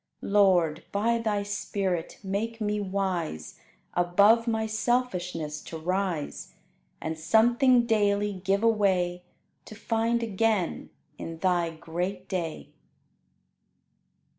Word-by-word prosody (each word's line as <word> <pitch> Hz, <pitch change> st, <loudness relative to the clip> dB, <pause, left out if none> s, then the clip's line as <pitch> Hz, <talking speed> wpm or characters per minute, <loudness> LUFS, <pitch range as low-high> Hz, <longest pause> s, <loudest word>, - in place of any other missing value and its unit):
Lord, 180 Hz, -6 st, +3 dB
by 230 Hz, +3 st, +1 dB
Thy 210 Hz, -3 st, -1 dB
Spirit, 195 Hz, -4 st, -3 dB
make 215 Hz, +4 st, -3 dB
me 210 Hz, -1 st, -1 dB
wise 185 Hz, -, -3 dB, 0.3 s
Above 200 Hz, +7 st, +4 dB
my 220 Hz, -1 st, 0 dB
selfishness 185 Hz, -9 st, -1 dB
to 165 Hz, -, -6 dB
rise, 180 Hz, -2 st, -3 dB, 0.4 s
And 160 Hz, 0 st, -4 dB
something 240 Hz, -, +4 dB
daily 205 Hz, -2 st, +1 dB
give 195 Hz, +2 st, +1 dB
away 190 Hz, -5 st, +2 dB, 0.4 s
To 215 Hz, -, -10 dB
find 230 Hz, +2 st, 0 dB
again 215 Hz, -3 st, 0 dB, 0.3 s
in 165 Hz, 0 st, -6 dB
Thy 175 Hz, -1 st, +1 dB
great 175 Hz, +4 st, -4 dB
day! 165 Hz, -, -4 dB
200 Hz, 100 wpm, -27 LUFS, 175-220 Hz, 0.4 s, Above